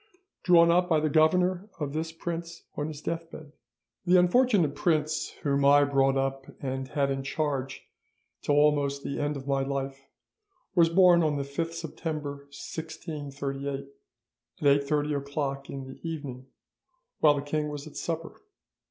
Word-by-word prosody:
"'Drawn 170 -2 +6
up 180 +1 +3
by 160 -2 +4
the 155 -1 0
Governor 180 +5 +3
of 145 -2 -3
this 160 +1 -2
Prince 170 0 -6
on 145 - -2
his 150 -2 -7
deathbed. 165 -2 -5 0.6
"'The 180 +1 +6
unfortunate 180 - +4
prince 155 0 0
whom 140 -1 +1
I 145 +1 +6
brought 135 -1 +2
up 135 0 -2
and 135 -1 -3
had 140 -1 0
in 135 0 -2
charge 135 -1 -3 0.6
till 145 - +1
almost 145 -1 +2
the 140 - -3
end 145 0 -1
of 135 - -8
my 135 -1 +1
life 135 0 -4 0.7
was 170 -3 +5
born 175 0 +6
on 155 -2 +1
the 140 - -1
5th 165 +4 -3
September 150 -4 -5
1638 140 -3 -5 0.7
at 140 0 +5
8.30 150 +1 0
o'clock 140 -1 -4
in 135 -1 -5
the 130 - -11
evening, 140 -6 -6 0.7
while 150 -2 +5
the 140 - -3
king 150 +1 -1
was 145 -1 -6
at 155 - -12
supper. 165 -1 -4
145 Hz, 150 wpm, -28 LUFS, 140-165 Hz, 0.7 s, Drawn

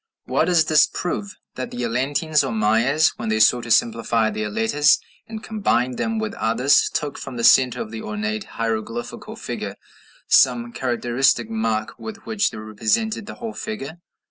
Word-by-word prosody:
What - - +1
does 170 -3 +3
this 155 -1 +5
prove? 200 +3 -4 0.2
That 130 - -5
the 120 - -5
Atlanteans, 140 +6 +1
or - - -3
Mayas, 115 +8 +3
when - - -3
they 110 0 +1
sought 120 +2 +4
to - - -8
simplify 115 -1 +2
their 105 0 -3
letters 130 +8 +3 0.3
and 220 -1 -8
combine 130 - 0
them 225 0 -1
with 220 -1 -3
others, 125 +5 +2
took 145 -2 -3
from 135 -3 -7
the 115 - -3
centre 125 +1 +5
of 110 - -5
the 110 -1 -6
ornate 105 0 -3
hieroglyphical 115 +1 -4
figure - - -5 0.5
some 120 -2 +3
characteristic 120 -2 0
mark 110 -1 -2
with 220 -1 -9
which 210 -2 +1
they - - -10
represented 115 - -1
the - - -7
whole 230 -2 -6
figure. 170 -7 -6
125 Hz, 170 wpm, -22 LUFS, 110-160 Hz, 0.5 s, this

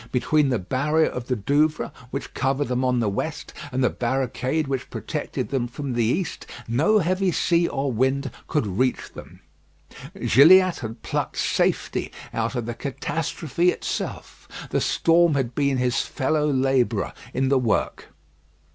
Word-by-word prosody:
Between 140 +3 +2
the 125 - +1
barrier 145 - +1
of 125 -1 -6
the 125 - 0
Douvres, 145 +8 +1 0.2
which 140 +2 -6
covered 135 0 0
them 125 0 0
on 125 -1 +2
the 110 - +1
west, 145 +10 -4 0.2
and 130 +1 0
the 125 - +3
barricade 130 +4 -1
which 135 -1 -3
protected - - -4
them 130 -3 -1
from 130 +2 -5
the 120 -1 +1
east, 145 - -2 0.2
no 150 - +3
heavy 185 0 +1
sea 170 0 +2
or 135 0 -2
wind 130 +3 0 0.2
could 150 -7 0
reach 115 +6 -1
them. - - -12 0.8
Gilliatt 180 - +6
had 115 -1 -7
plucked - - -3
safety - - 0 0.2
out 115 +3 -1
of 120 -2 -2
the 120 - -3
catastrophe 155 +4 -1
itself. - - -4 0.2
The - - +1
storm 170 -1 +3
had 130 -3 -1
been 140 -1 +1
his 125 -1 +1
fellow 150 +1 0
labourer 130 -5 +1 0.2
in 130 0 +1
the 135 -1 +4
work. 120 -3 -1
135 Hz, 155 wpm, -24 LUFS, 125-150 Hz, 0.8 s, Gilliatt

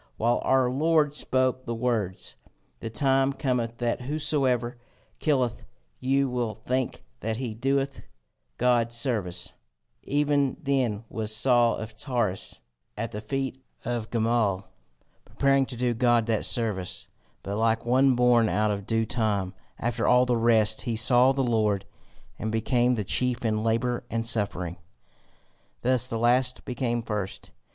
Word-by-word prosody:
While 120 +2 +1
our 130 -1 +3
Lord 150 +3 +2
spoke 130 -3 0
the 115 - -2
words: 115 -6 -2 0.4
The 115 - -5
time 135 +3 +2
cometh 125 -4 -1
that 120 0 -1
whosoever 130 -4 0 0.4
killeth 130 -6 0 0.4
you 135 +2 +2
will 120 -3 -2
think 125 +3 -2 0.2
that 110 0 -3
he 125 -3 -4
doeth 135 +4 -1 0.6
God 120 -1 +2
service, 115 -8 -2 0.5
even 145 -1 +1
then 130 -8 0
was 110 0 -3
Saul 120 0 +3
of 110 0 -7
Tarsus 110 - -3 0.4
at 115 +1 -3
the 105 - -5
feet 135 +3 -3 0.2
of 120 -2 -3
Gamaliel, 110 -4 +1 0.6
preparing 135 -1 +2
to 125 - -6
do 125 0 +1
God 120 -1 +3
that 110 -2 0
service; 95 -6 -2 0.4
but 100 - -4
like 115 0 +1
one 130 +2 +4
born 120 -2 +4
out 105 0 +1
of 100 -1 -4
due 115 0 +1
time, 100 -5 -1 0.2
after 120 0 -1
all 125 0 +5
the 125 -1 +1
rest 110 -2 +3
he 115 - -2
saw 125 +3 +5
the 135 0 0
Lord, 105 -5 +1 0.5
and 110 0 -2
became 120 +2 +2
the 110 - -2
chief 125 +4 0
in 110 -1 0
labour 120 +2 0
and 115 0 -2
suffering. 100 -6 -2 1.1
Thus 125 0 +3
the 115 - -3
last 125 +2 +2
became 120 -2 -2
first. 105 -3 -5
120 Hz, 145 wpm, -26 LUFS, 110-130 Hz, 1.1 s, all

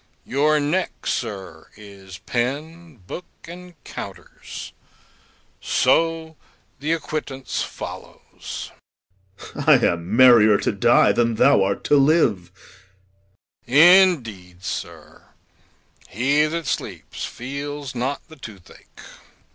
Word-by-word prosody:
Your 150 +3 +2
neck, 155 +6 -2
sir, 95 -8 -5
is 100 -3 -12
pen, 150 +9 -4
book, 180 - -8 0.2
and 180 +1 -11
counters; - - -9 0.9
so 160 +3 0 0.4
the 150 +3 -2
acquittance 150 -5 -4
follows. - - -8 0.7
POSTHUMUS. - - -9
I - - +6
am 85 +4 -1
merrier 115 -5 +7
to - - -1
die - - +4
than 115 -1 +1
thou 140 0 +4
art 100 +1 -2
to 145 - +3
live. 135 - +2 1.2
GAOLER. 135 +5 +5 0.2
Indeed, 105 - -2
sir, 100 - -7 0.9
he 140 +8 +1
that 165 +1 -4
sleeps - - -5
feels 140 +2 -6
not 130 +3 -4
the 160 -1 -15
toothache. 105 -9 -14
135 Hz, 100 wpm, -22 LUFS, 105-155 Hz, 1.2 s, merrier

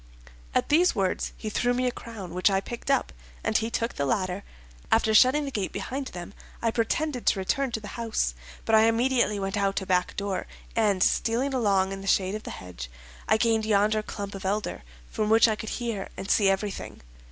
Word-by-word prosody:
At - - +1
these 345 +4 +4
words 190 -2 0
he 220 - -6
threw 245 +3 +1
me 255 +1 0
a 250 - +2
crown, 210 -8 -8
which 180 +3 +3
I 195 -1 +2
picked 240 +6 -7
up, 275 - +1 0.3
and 220 - -1
he 225 +1 +2
took 230 0 -1
the 140 - -1
ladder. 185 +5 0 0.5
After 220 -1 +3
shutting 260 +6 +5
the 275 - -4
gate 200 -6 -2
behind 270 +1 -4
them, 175 -1 -8 0.3
I 230 - +1
pretended 250 +4 -1
to - - +4
return 250 +8 0
to 220 - -1
the 205 -1 -9
house, 225 - 0 0.3
but 225 - 0
I 220 0 +7
immediately 235 -2 +2
went 195 +1 -2
out 200 -1 +1
a 190 - -6
back 180 -1 +1
door, 200 -2 -2 0.3
and 205 -4 +3
stealing 250 +5 +1
along 200 -6 +2
in 195 0 -5
the 195 - -8
shade 190 0 +2
of 215 - -4
the - - -8
hedge, 85 -10 -8 0.4
I 220 - +4
gained 225 -1 +2
yonder 215 0 +2
clump 205 -1 -6
of 195 - -7
elder, 205 - -2 0.3
from 215 -1 -2
which 225 +2 +6
I 220 - +1
could 220 +1 -6
hear 230 -5 -3
and 190 - -3
see 200 -2 +4
everything. 195 +1 -3
215 Hz, 210 wpm, -27 LUFS, 195-230 Hz, 0.5 s, I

